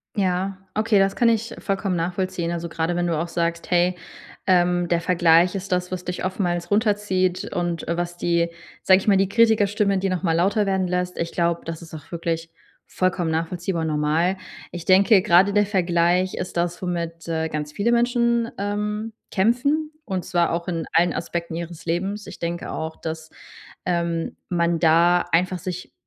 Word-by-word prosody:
Ja, 190 0 0 0.2
okay, 215 0 +2
das 195 0 +3
kann 235 -1 +4
ich 230 +1 0
vollkommen 195 -2 -1
nachvollziehen. 175 0 -2
Also, 170 0 -3
gerade 165 +1 -2
wenn 175 0 0
du 165 -2 0
auch 170 - -2
sagst: 170 0 -2
„Hey, 180 0 +3 0.5
ähm, 175 -1 +3
der 170 0 +1
Vergleich 175 0 +4
ist 195 -1 -5
das, 180 0 0
was 180 -1 -4
dich 180 0 -4
oftmals 175 -1 -2
runterzieht 205 -4 +1
und, 175 -1 -2
äh, 170 - 0
was 175 0 -3
die 170 -1 +1 0.3
sage 190 - +6
ich 195 - -9
mal, 195 -2 +5
die 195 0 +2
Kritikerstimme, 210 -3 +3
die 195 0 0
nochmal 180 -2 0
lauter 200 +4 +2
werden 190 -1 0
lässt. 180 0 -2
Ich 170 0 -2
glaube, 170 -1 0
das 165 0 -6
ist 165 - -13
auch 155 +1 -10
wirklich 165 -1 -3 0.4
vollkommen 185 -2 0
nachvollziehbar 165 +1 -2
und - - -1
normal. 155 +5 +1 0.3
Ich 175 -2 -7
denke, 195 +1 +6
grade 185 +4 +4
der 205 -1 +3
Vergleich 180 -1 +2
ist 180 - -5
das, 175 +1 -1
womit, 170 -2 -4
äh, 160 -1 -1
ganz 150 -1 -4
viele 225 +7 0
Menschen, 235 -1 +2
ähm, 210 +2 -3 0.2
kämpfen, 280 +10 +1
und 185 -2 -3
zwar 170 -1 +1
auch 170 +1 -2
in 165 -3 -2
allen 175 0 +3
Aspekten 170 0 -4
ihres 170 0 -6
Lebens. 195 +5 -2
Ich - - -10
denke 170 0 -4
auch, 160 0 -4
dass, 160 -1 -6 0.6
ähm, 170 -2 -1
man 170 -1 +1
da 170 +2 +4
einfach 180 +2 +2
sich, 180 +1 -6
180 Hz, 180 wpm, -23 LUFS, 170-195 Hz, 0.6 s, sage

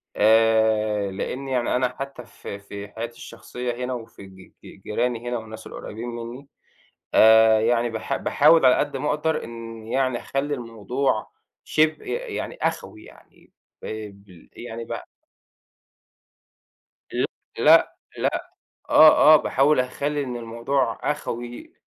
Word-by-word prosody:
آآ 110 -2 +3
لإن 130 +7 -5
يعني 125 -3 0
أنا 125 0 0
حتّى 135 -3 -6
في 100 -3 -9
في 100 0 -9
حياتي 115 +3 -7
الشخصية 125 +1 -6
هنا 130 - -3
وفي 115 -4 -9
ج 95 -1 -16 0.2
ج 95 - -14
جيراني 120 +2 -2
هنا 120 - -1
والناس 110 -1 -9
القُريّبين 115 +3 -8
منّي، 120 +3 -8 0.7
آآ 110 0 +7
يعني 120 +1 +2
باح 115 +4 -3
باحاول 150 +2 +4
على 130 - +7
قد 145 -2 -1
ما 150 +3 -2
أقدَر 160 +2 0
إن 115 -1 -9
يعني 130 0 0
أخلّي 145 +2 -2
الموضوع 120 0 -2 0.3
شِبه 155 0 +1
ي - - -7 0.3
يعني - - -5
أخوَي - - -3
يعني، - - -19 0.3
آآ 110 -1 -5
ب 100 -3 -18
يعني 115 -1 -7
ب - - -11 2.2
ل - - +1 0.3
لأ، - - +5 0.2
لأ. - - -2 0.4
آه، 155 0 +8
آه، - - +10
باحاول 140 0 +2
أخلّي 140 +3 -1
إن 125 -2 -5
الموضوع 115 +2 -2
أخوي. 120 -5 -6
120 Hz, 135 wpm, -23 LUFS, 110-135 Hz, 2.2 s, آه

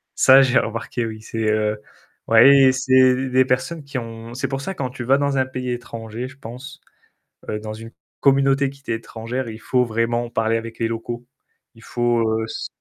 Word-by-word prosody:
Ça 135 +1 +7
j'ai 130 0 +4
remarqué 115 +1 -3
oui, 110 -1 -7
c'est 115 +1 -6
heu, 105 0 0 0.5
ouais, 115 +4 +7 0.2
et - - +6
c'est 130 0 +4
d 130 0 -3
des 130 0 +3
personnes 140 +5 -1
qui 140 -1 -6
ont 115 0 -7
c'est 130 0 -2
pour 135 +1 -4
ça 195 +7 -5
quand 130 -5 -3
tu 125 -1 -7
vas 135 +3 +3
dans 140 -1 0
un 130 - +2
pays 125 -1 -4
étranger 115 0 -6
je 130 +1 -14
pense, 130 +3 -10 0.7
heu, 105 - -2
dans 110 0 -6
une 115 +1 -10 0.3
communauté 135 0 +3
qui 140 0 -15
t'est 120 - -3
étrangère, 115 +2 -5
il 110 0 -8
faut 125 -1 +1
vraiment 115 +1 -1
parler 115 0 0
avec 115 0 -8
les 115 - +1
locaux. 120 +1 -5 0.5
Il 115 - -17
faut, 120 -1 0 0.2
heu - - -2
s - - -6
120 Hz, 205 wpm, -21 LUFS, 115-130 Hz, 0.7 s, Ça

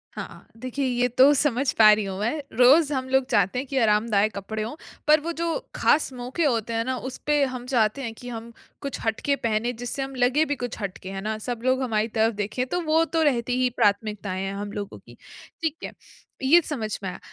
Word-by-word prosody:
हाँ, - - -4
हाँ। - - -16
देखिए 255 +3 -3
ये 245 -1 +1
तो 260 +4 +5
समझ 275 -2 +1
पा 215 -1 +7
रही 210 0 0
हूँ 190 -1 -5
मैं। 235 +9 -1 0.2
रोज़ 280 +5 +6
हम 260 -1 -2
लोग 265 0 +3
चाहते 205 -1 +2
हैं 270 - -5
कि 270 - -3
आरामदायक 215 -1 +2
कपड़े 215 +2 -4
हों, 225 +6 -5 0.3
पर 305 +1 +6
वो 330 +3 -4
जो 335 +3 -1 0.2
ख़ास 300 -2 +2
मौके 250 +6 -3
होते 230 -4 0
हैं 225 0 0
ना, 260 0 -1
उसपे 285 +3 -1
हम 255 -2 -3
चाहते 245 0 +1
हैं 230 -4 -4
कि 245 +2 -10
हम 230 0 -7 0.3
कुछ 280 -2 -5
हटके 225 +5 0
पहने, 235 -2 -1
जिससे 245 +3 -4
हम 270 0 -5
लगे 260 +5 +3
भी 290 - -1
कुछ 245 - -5
हट 195 -2 -4
के, 185 - -9
है 195 0 -5
ना? 215 +2 -3
सब 235 +2 -4
लोग 260 +1 +2
हमारी 220 -3 0
तरफ 225 +1 +3
देखें। 210 +5 -2
तो 355 +7 -1
वो 320 0 +3
तो 325 0 -1
रहती 250 -4 +1
ही 255 - +3
प्राथमिकताएँ 200 -2 0
हैं, 195 - -3
हम 205 +1 -5
लोगों 205 -1 -6
की, - - -17 0.4
ठीक 320 -1 -1
है। - - -6 0.5
ये 320 +7 +6
समझ 220 -8 -3
में 190 - -2
आया। - - -8
245 Hz, 230 wpm, -25 LUFS, 215-275 Hz, 0.5 s, पा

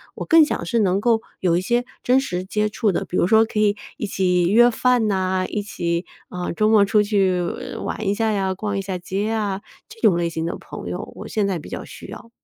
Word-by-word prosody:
我 - - -5
更 325 -1 +7
想 295 - -2
是 230 +7 0
能 195 -2 +2
够 225 +1 +2 0.2
有 175 -3 +2
一 175 - +1
些 240 +5 0 0.2
真 255 +2 +4
实 180 -9 -3
接 210 +3 0
触 210 0 0
的， - - -2
比 - - -6
如 - - +3
说 220 +3 +5
可 220 - -3
以 210 -1 +2 0.2
一 - - -3
起 180 -2 +1
约 240 +3 +6
饭 245 -1 +2
呐， 185 -2 0
一 210 - -2
起， 170 -4 -2 0.2
啊， 180 0 -4
周 215 +5 +1
末 215 -2 +6
出 205 +1 +3
去 195 -3 +1 0.4
玩 220 - -4
一 200 - +2
下 225 0 +1
呀， 195 -2 0
逛 205 +1 -3
一 - - -1
下 190 -1 -4
街 190 +3 -3
呀， 210 -3 -1 0.3
这 450 +1 -15
种 175 - +4
类 170 -1 0
型 165 0 -3
的 - - -4
朋 - - -8
友， - - -6
我 - - -8
现 210 -2 0
在 185 -3 -1
比 - - -11
较 - - -6
需 - - -11
要。 230 - -10
200 Hz, 260 characters per minute, -22 LUFS, 185-220 Hz, 0.4 s, 更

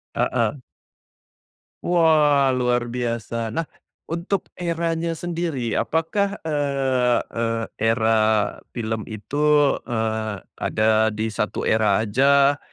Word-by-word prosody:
Heeh. 120 +3 0 1.3
Wah 155 -5 +4
luar 120 -1 0
biasa! 115 -2 -3
Nah, 165 -1 -2 0.4
untuk 170 +4 -2
eranya 165 -1 -1
sendiri 165 -7 -3
apakah, 200 +5 0
eee 135 -5 +1
eee, 115 0 -2
era 110 0 +1 0.6
film 110 -2 -3
itu, 110 +6 -7 0.5
eee, 110 -4 -2 0.2
ada 110 0 +2
di 110 +1 -2
1 105 0 -2
era 110 -1 +3
aja 140 +5 +3
125 Hz, 95 wpm, -22 LUFS, 110-160 Hz, 1.3 s, Wah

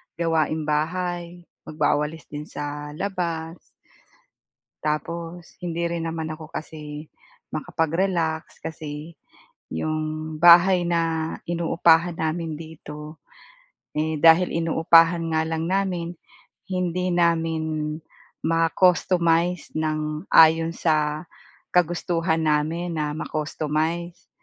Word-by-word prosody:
gawaing 160 -2 0
bahay, 175 +3 -2 0.2
magwawalis 150 0 0
din 150 0 -6
sa 145 0 -6
labas. 170 -3 -3 1.2
Tapos 165 +3 -4
hindi 170 -1 -3
rin 170 -1 -3
naman 160 -1 -3
ako 155 -1 -10
kasi 150 -1 -7 0.4
makapag-relax 165 -1 -1
kasi, 155 0 -7 0.6
yung 155 0 -3
bahay 175 +1 +7
na 165 -1 0
inuupahan 170 0 +3
namin 160 0 -2
dito, 155 -1 -10 0.7
eh, 155 +1 -1
dahil 165 +3 +6
inuupahan 165 +1 +4
nga 160 - +2
lang 160 0 -2
namin, 180 -3 -1 0.6
hindi 180 0 -1
namin 160 -3 0 0.5
ma-customize 170 +1 +2
ng 155 -1 -2
ayon 165 +1 +6
sa 155 -1 0 0.5
kagustuhan 170 -1 +1
namin 160 +3 0
na 150 -1 -1
ma-customize. 155 +3 -3
165 Hz, 90 wpm, -24 LUFS, 155-170 Hz, 1.2 s, bahay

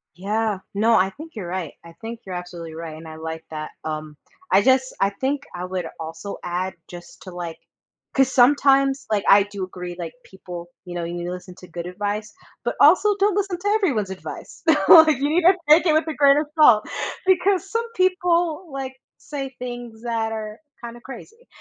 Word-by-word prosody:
Yeah, 210 +2 -1 0.2
no, 225 +3 +3
I 190 -2 +4
think 315 +8 -11
you're 195 -5 -5
right, 175 -3 -4
I 170 0 -13
think 225 +1 -6
you're 185 -2 -6
absolutely 175 -2 -7
right, 165 -1 -7
and 160 +1 -11
I 155 - -9
like 160 0 -6
that, 155 -1 -6
um, 155 -1 -5 0.4
I 195 - +6
just 260 +2 +3
I 195 - +4
think 265 +7 -2
I 180 +1 -4
would 180 -1 -3
also 165 +5 -6
add 180 +2 -2
just 175 -1 -12
to 185 - -9
like 175 -2 -6 0.6
'cause 265 -1 +3
sometimes, 275 +1 +4
like, 205 -2 +1
I 200 +1 +8
do 200 -1 -6
agree, 180 -1 -6
like, 170 -2 -6
people, 180 -2 -9 0.2
you 175 - -8
know, 175 -1 -3
you 170 +1 -4
need 175 - -4
to 175 - -4
listen 180 0 -8
to 180 - -13
good 170 +1 -6
advice, 205 +3 -3 0.3
but - - -2
also 415 -1 +6
don't 400 -1 +2
listen 390 -3 -1
to 405 - -4
everyone's 290 - +1
advice. 190 - -9 0.3
Like, 315 -4 +8
you 285 +2 0
need 340 +3 +2
to 360 +2 +6
take 325 +4 +6
it 310 - +4
with 315 +1 +2
a 315 - -2
grain 280 -1 +5
of 300 - +1
salt, 240 -9 +6 0.4
because 380 +1 +2
some 460 +1 0
people, 355 -3 +1
like, 265 -1 -5 0.2
say 270 -3 -6
things 240 -2 -7
that 225 -2 -1
are 215 0 -6 0.2
kind 235 0 -7
of 240 - -13
crazy. 440 - -12
220 Hz, 205 wpm, -22 LUFS, 180-290 Hz, 0.6 s, I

